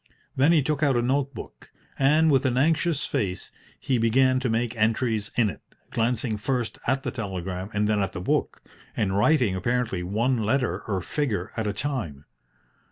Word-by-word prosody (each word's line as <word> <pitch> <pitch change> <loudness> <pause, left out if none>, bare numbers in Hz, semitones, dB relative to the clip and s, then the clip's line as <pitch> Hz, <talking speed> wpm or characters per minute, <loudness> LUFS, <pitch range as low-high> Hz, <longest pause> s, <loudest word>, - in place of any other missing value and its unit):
Then 140 +5 +4
he 160 -4 +4
took 150 +1 -1
out 140 -4 +3
a - - +2
note 135 +1 0
book, - - -10 0.3
and, 155 +3 +4
with 135 -2 +3
an 125 -1 0
anxious 160 +2 +2
face, 95 -3 -3 0.3
he 130 -3 0
began 130 +3 +3
to 130 -1 -1
make 115 +1 -1
entries 110 -1 0
in 115 -3 +4
it, 100 - -6 0.3
glancing 115 -1 0
first 120 +2 -2
at 135 +2 +1
the - - -2
telegram 95 -4 -4
and 105 -1 0
then 105 -1 +1
at 95 -1 -2
the - - -5
book, 90 - -1 0.3
and 95 -2 0
writing 115 -2 +3
apparently 115 -1 -1
one 115 +7 0
letter 110 -4 0
or 95 -4 -1
figure 110 -9 -2
at 110 -2 -2
a 105 - -1
time. 105 - -4
115 Hz, 180 wpm, -25 LUFS, 105-135 Hz, 0.3 s, Then